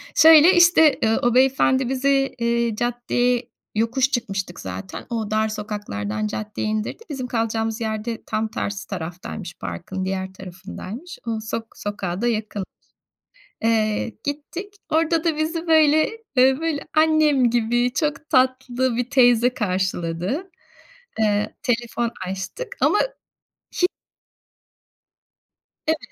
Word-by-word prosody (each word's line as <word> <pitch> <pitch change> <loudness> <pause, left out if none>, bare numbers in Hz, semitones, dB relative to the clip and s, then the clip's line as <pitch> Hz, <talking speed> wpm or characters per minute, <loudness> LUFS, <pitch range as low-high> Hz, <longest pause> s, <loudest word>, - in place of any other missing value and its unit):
Şöyle, 320 +2 +8
işte, 345 -4 +6
ııı, 220 0 +2
o 240 0 +2
beyefendi 260 0 +3
bizi, 270 +1 +1
ııı, 235 -1 +1
caddeye, 245 +1 0 0.3
yokuş 245 +5 +1
çıkmıştık 195 -8 -3
zaten. 190 -2 -7
O 220 -3 -3
dar 215 0 +2
sokaklardan 155 - -4
caddeye 210 - -4
indirdi. 215 - -3
Bizim 265 -4 -4
kalacağımız 225 -1 -1
yer 220 -1 -2
de 230 -2 -4
tam 215 +1 -1
tersi 200 -2 -4
taraftaymış, 175 +1 -6
parkın 95 - -5
diğer 190 0 -3
tarafındaymış. 190 - -9
O 225 -1 -1
sok 225 +1 -4
sokağa 195 -3 -4
da 240 - +1
yakın. 215 -3 -2 1.0
Eee, 220 0 +1
gittik. 320 +7 -5 0.2
Orada 325 0 +2
da 325 -3 +1
bizi 325 +2 -2
böyle, 315 -1 +5 0.3
eee, 260 +1 +5
böyle, 320 -3 -2
annem 310 -5 +4
gibi, 240 +1 +1
çok 300 0 -1
tatlı 255 -1 +2
bir 245 +1 -2
teyze 245 -2 +4
karşıladı. 190 - -2 0.7
Iıı, 210 -1 +2 0.2
telefon 240 -2 -1 0.2
açtık 195 - -5
ama 415 - +4 0.8
hi 360 - +6 2.0
Evet. 320 0 +3
235 Hz, 120 wpm, -22 LUFS, 210-275 Hz, 2.0 s, Şöyle